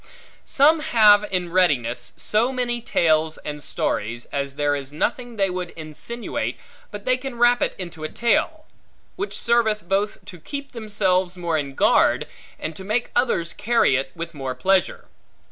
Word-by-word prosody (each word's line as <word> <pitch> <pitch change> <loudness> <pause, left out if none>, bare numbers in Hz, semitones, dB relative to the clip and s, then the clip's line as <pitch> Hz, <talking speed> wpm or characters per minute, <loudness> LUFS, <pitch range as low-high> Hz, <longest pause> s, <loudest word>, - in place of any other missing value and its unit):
Some 305 +4 +4
have 210 -7 +5
in 180 -2 -1
readiness 125 - +1
so 225 +5 +1
many 240 -2 -2
tales 160 -8 +2
and 150 -1 -7
stories, 120 +3 -2
as 140 -1 -3
there 145 0 +1
is 140 -1 -6
nothing 235 - -2
they 195 -3 +1
would 180 -1 -4
insinuate, 165 +9 -5 0.3
but 205 -1 -9
they 255 0 +3
can 260 -1 -7
wrap 240 +1 +4
it - - 0
into 170 -4 -8
a 155 - -3
tale; 310 +7 0 0.5
which 395 +2 -4
serveth 220 -5 +1
both 200 +3 0
to 185 -3 -11
keep 280 - -7
themselves 190 -5 0
more 170 -2 -1
in 140 -3 -3
guard, - - +3 0.3
and 155 0 -5
to 190 - -8
make 215 +5 -1
others 235 -9 +1
carry 230 - +2
it 135 0 -2
with 170 0 -6
more 135 -3 -4
pleasure. 185 +7 +1
190 Hz, 160 wpm, -23 LUFS, 155-235 Hz, 0.5 s, have